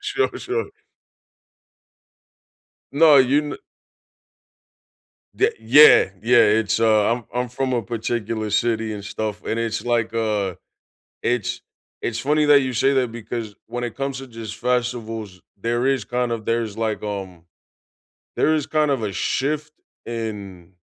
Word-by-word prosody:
Sure, 410 0 0
sure. 435 +5 -2 2.3
No, 150 +1 +6
you 135 +2 +5
kno 145 -1 -5 1.8
the 430 +3 +2
Yeah, 150 -9 +7
yeah. 120 +2 +4 0.2
It's, 110 0 0
uh, 110 -1 +4
I'm 120 -2 -4
I'm 125 0 -1
from 130 +2 -2
a 120 -2 0
particular 115 -1 -3
city 110 +1 0
and 100 -2 -7
stuff, 105 0 -4
and 115 - -2
it's 115 -1 -2
like, 115 -2 0
uh 105 -5 -1 0.7
it's 120 -4 -1 0.4
It's 115 -1 -2
funny 150 +3 +2
that 145 -1 +6
you 130 -1 -2
say 135 +4 +2
that 125 -4 +1
because 115 -2 -6
when 120 +1 -4
it 120 - -4
comes 135 -1 -3
to 135 - -9
just 115 -3 -8
festivals, 115 -5 -2 0.2
there 120 +5 0
is 135 -4 +1
kind 125 -1 -1
of 115 -2 -4
there's 115 -2 -1
like, 110 -1 -2
um 95 -5 -6 0.9
there 155 - +3
is 150 -3 -1
kind 155 -1 +1
of 135 -4 0
a 105 -2 -2
shift 150 +7 -2 0.3
in 100 -6 -6
115 Hz, 145 wpm, -22 LUFS, 110-135 Hz, 2.3 s, Yeah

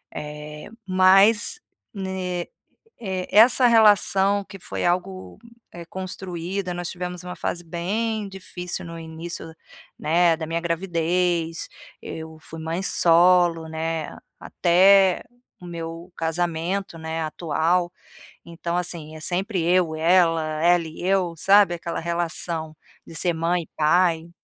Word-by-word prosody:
Eh, 150 0 -8 0.2
mas 195 - +4 0.3
ne 190 -3 -4 0.5
eh, 190 -4 -4
essa 235 +5 +6
relação 205 -3 +4
que 195 0 -11
foi - - -5
algo, 185 +2 -2 0.3
eh, 170 -1 -9
construída, 185 0 -5
nós 175 0 -4
tivemos 180 -1 -6
uma 180 0 -7
fase 175 - -3
bem 205 +6 -2
difícil 180 -2 -7
no 165 -1 -8
início, 165 0 -7 0.4
né, 170 +1 +2
da 160 - -5
minha 165 +1 -2
gravidez, 170 -1 -1 0.3
eu 160 0 -8
fui 160 +1 -10
mãe 165 +3 -3
solo, 175 -2 +4
né, 160 0 -4 0.2
até 190 +2 +4 0.4
o 180 - -11
meu 165 +1 -7
casamento, 170 +3 -2
né, 160 0 -4
atual. 170 +3 0 0.5
Então, 170 +1 -4
assim, 165 -3 -4
é - - -10
sempre 185 +3 -1
eu, 175 -2 +2
ela, 165 0 +3 0.2
ela 175 0 +4
e 160 - -10
eu, 185 -2 +1
sabe, 195 +1 +5
aquela 170 0 -5
relação 165 -1 -3 0.3
de - - -12
ser 175 +2 +1
mãe 170 +2 0
e - - -14
pai. 165 +1 +2
175 Hz, 125 wpm, -23 LUFS, 165-185 Hz, 0.5 s, essa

